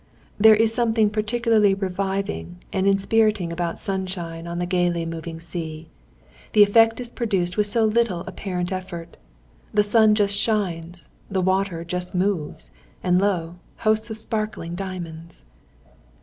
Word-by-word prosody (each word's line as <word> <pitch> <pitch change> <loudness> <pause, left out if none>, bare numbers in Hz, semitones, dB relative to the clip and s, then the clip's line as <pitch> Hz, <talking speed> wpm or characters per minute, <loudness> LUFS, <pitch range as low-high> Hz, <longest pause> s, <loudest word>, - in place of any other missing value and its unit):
There 220 +1 +8
is 225 +1 +3
something 225 -3 +2
particularly 215 -1 +2
reviving 190 - -3 0.2
and 190 +1 +1
inspiriting 200 -2 +2
about 170 0 -2
sunshine 180 -4 -4
on 170 0 -4
the 175 - -1
gaily 175 -2 0
moving 165 0 -6
sea. 165 -1 -7 0.6
The 210 - +8
effect 225 +3 +4
is 245 -1 -5
produced 190 -8 -1
with 210 -1 +2
so 225 +2 +2
little 215 -5 +1
apparent 180 -1 -4
effort. 180 -3 -6 0.6
The 210 - +3
sun 215 0 +4
just 205 -1 +1
shines; 175 -6 -2 0.2
the 195 - -1
water 185 -2 0
just 180 +1 -2
moves; 180 -5 -2 0.3
and 180 0 +3
lo, 175 -4 -1 0.2
hosts 220 +1 +1
of 220 - -3
sparkling 215 -6 -3
diamonds! 175 - -7
190 Hz, 135 wpm, -23 LUFS, 170-215 Hz, 0.6 s, There